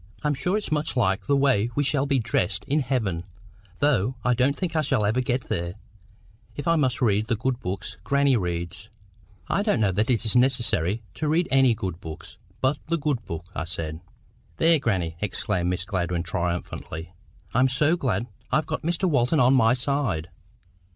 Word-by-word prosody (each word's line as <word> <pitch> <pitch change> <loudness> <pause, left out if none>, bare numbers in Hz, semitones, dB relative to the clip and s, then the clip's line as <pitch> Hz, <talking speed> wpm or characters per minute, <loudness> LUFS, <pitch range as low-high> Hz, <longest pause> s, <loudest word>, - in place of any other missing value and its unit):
I'm 150 -1 +2
sure 180 +9 0
it's 210 - -5
much 150 -2 -1
liker 95 -5 +1
the 140 -1 +3
way 130 -6 +3
we 145 - +2
shall 140 0 +1
be 140 -1 +2
dressed 105 -4 0
in 145 +2 +1
heaven, 110 - -1 0.5
though 130 -4 +2
I 125 - +3
don't 130 +4 +2
think 170 -3 -3
I 155 - +3
shall 135 -8 +1
ever 110 +5 +2
get 125 0 -1
there, 85 +1 -2 0.8
if 145 - -5
I 165 - +4
must 130 -4 +1
read 105 -1 +2
the 115 - +1
good 125 +3 -1
books 95 +1 -5
grannie 140 -1 +3
reads." 85 -4 -3 0.6
"I 195 - +1
don't 205 - +1
know 105 -3 +3
that 105 +6 0
it 120 -2 +1
is 110 - 0
necessary 120 - +2
to 155 - -3
read 165 +3 +2
any 130 -3 +5
good 95 -4 -5
books 80 0 -9 0.2
but 135 +2 +1
the 170 +1 +1
good 145 -6 -1
book," 85 +1 -6
I 85 - -3
said. 80 -2 -4 0.6
"There, 165 - +5
grannie!" 90 -10 -1
exclaimed 95 -3 -1
Miss 90 0 -2
Gladwyn, 90 -3 -1
triumphantly. 85 -1 -4 0.4
"I'm 130 +2 +4
so 150 +6 +3
glad 120 - -1 0.3
I've 155 0 +2
got - - -3
Mr 175 +3 0
Walton 145 -1 +2
on 125 +1 +5
my 115 -2 +5
side!" 125 - -1
120 Hz, 185 wpm, -25 LUFS, 95-140 Hz, 0.8 s, any